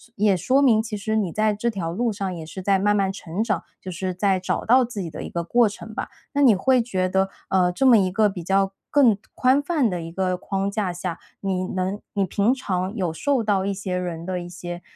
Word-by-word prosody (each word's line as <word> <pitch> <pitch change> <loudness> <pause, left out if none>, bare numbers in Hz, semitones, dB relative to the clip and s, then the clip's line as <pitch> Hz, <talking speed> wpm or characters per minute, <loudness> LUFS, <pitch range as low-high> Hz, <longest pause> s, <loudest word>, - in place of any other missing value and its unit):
也 200 -2 +3
说 265 - +2
明 225 -5 +4
其 220 -1 -5
实 215 +2 -2
你 200 -6 0
在 215 +3 +2
这 235 +3 -1
条 175 -6 -3
路 230 +5 -1
上， 195 -2 -3
也 165 -2 -7
是 175 +4 -8
在 195 +1 +3
慢 205 +2 +2
慢 195 -1 +1
成 190 +2 -4
长， 200 -7 -1 0.2
就 185 - -7
是 185 +1 -3
在 190 +1 +1
找 185 - -2
到 250 +2 +5
自 230 -4 -6
己 170 - -4
的 155 - -7
一 - - -6
个 170 0 -2
过 235 +6 +3
程 220 +1 -8
吧。 - - -4 0.2
那 285 0 +2
你 245 - +7
会 255 +6 +3
觉 190 -6 -1
得， 190 +1 +1 0.2
呃， 180 -2 +3
这 265 +9 +2
么 240 - +8
一 185 -3 +2
个 210 +1 +3
比 180 -4 -7
较 195 +2 +2 0.2
更 245 -8 +5 0.2
宽 255 +2 +3
泛 290 -6 +1
的 180 -3 -3
一 165 - -7
个 185 0 -1
框 195 +1 -2
架 200 -3 -2
下， 175 -1 -4 0.2
你 190 -2 -1
能 190 +2 -2
你 200 -2 +1
平 200 +6 +2
常 190 -6 -2
有 180 -7 -1
受 260 - 0
到 200 -3 +1
一 200 - 0
些 185 -1 -3
人 175 -2 -4
的 185 0 -2
一 175 - -7
些， 175 0 -7
195 Hz, 265 characters per minute, -23 LUFS, 180-220 Hz, 0.2 s, 么